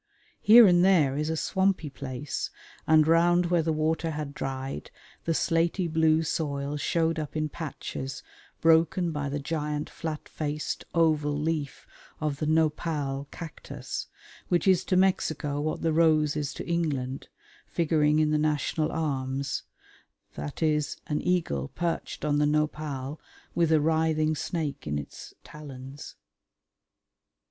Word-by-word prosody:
Here 230 +2 +9
and 175 -2 +5
there 160 -8 +4
is 150 +2 -1
a 160 - -1
swampy 190 -4 0
place, 135 +1 -4 0.4
and 155 -1 +6
round 175 +2 +4
where 175 -2 +4
the 160 0 0
water 160 +1 0
had 150 -2 -4
dried 135 -1 -4 0.4
the 165 - +1
slaty 170 +3 +1
blue 160 0 +3
soil 145 -2 -2
showed 165 +2 0
up 150 -1 -5
in 155 0 -1
patches 135 -4 -6 0.4
broken 165 +2 +4
by 145 -2 -2
the 145 - -2
giant 150 0 -3
flat 160 -2 -5
faced, 150 -1 -4
oval 155 -3 +2
leaf 150 -2 -2 0.3
of 150 -2 -1
the 150 - -2
Nopal 150 -3 0
cactus, 140 -5 -7 0.4
which 175 +2 +1
is 185 -1 +5
to 185 - +2
Mexico 155 -6 +1
what 155 +1 -2
the 165 -1 +2
rose 155 -2 +3
is 150 -1 -2
to - - -6
England, 145 -6 -1 0.4
figuring 155 -2 +2
in 155 -1 +3
the 150 - +2
national 155 +1 0
arms 135 -3 -2 0.7
viz. 150 - -1
an 150 - -1
eagle 160 - 0
perched 170 - -3
on 145 -1 +2
the 150 - +3
Nopal 150 -2 -2 0.3
with 165 -2 +2
a 160 - +5
writhing 160 0 +2
snake 150 - -3
in 75 0 -1
its 70 - -8
talons. 140 -2 -10
155 Hz, 135 wpm, -27 LUFS, 145-165 Hz, 0.7 s, Here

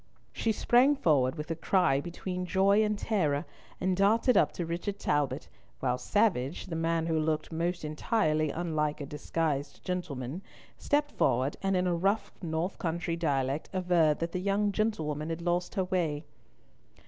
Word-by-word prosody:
She 225 - 0
sprang 245 +6 +4
forward 145 - +2
with 150 +1 -5
a - - 0
cry 160 -5 +2
between 180 +2 -5
joy 200 +3 +4
and 210 -1 0
terror, 155 -11 0 0.3
and 185 0 +1
darted 220 +6 +3
up - - +4
to 175 - -3
Richard 175 +5 -3
Talbot, 145 -7 -1 0.3
while 125 -1 0
Savage, 170 - +1
the 170 - -5
man 165 0 0
who 160 -1 +1
looked 155 +1 -1
most 170 +1 -2
entirely 155 -1 +1
unlike 155 -2 -1
a 145 - -4
disguised 150 0 -2
gentleman, 160 -4 -4 0.3
stepped 290 0 0
forward, 130 +4 +1
and 195 -1 +1
in 180 - +1
a 180 - +1
rough, 195 +6 0
north 165 +2 -2
country 170 0 -2
dialect, 140 -3 -1
averred 175 -5 +3
that 165 0 -3
the 185 - -2
young 200 +1 +1
gentlewoman 160 -8 -1
had 165 +1 -4
lost 175 +2 -1
her 190 - +2
way. 165 -5 -1
170 Hz, 160 wpm, -30 LUFS, 150-190 Hz, 0.3 s, sprang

